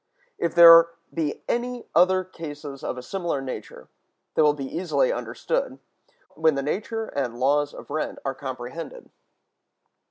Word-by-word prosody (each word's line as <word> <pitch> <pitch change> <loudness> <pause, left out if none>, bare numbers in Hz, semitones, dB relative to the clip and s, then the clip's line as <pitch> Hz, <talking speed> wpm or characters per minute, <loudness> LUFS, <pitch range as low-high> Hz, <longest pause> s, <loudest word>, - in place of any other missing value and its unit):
If 170 - -1
there 165 -1 +10 0.3
be 155 -3 -3
any 245 0 -2
other 185 +3 +4
cases 150 -6 -9
of - - -3
a 125 - -7
similar 175 -3 -2
nature, 135 -1 -7 0.5
they - - +2
will 150 -1 +4
be 140 -2 -5
easily 185 - 0
understood, - - -3 0.6
when 160 -2 +2
the 140 - -2
nature 220 +9 -2
and 125 -4 -3
laws 145 +2 +2
of - - -11
rent 155 +1 -3
are 135 - -1
comprehended. 130 +3 -7
155 Hz, 145 wpm, -25 LUFS, 140-185 Hz, 0.6 s, there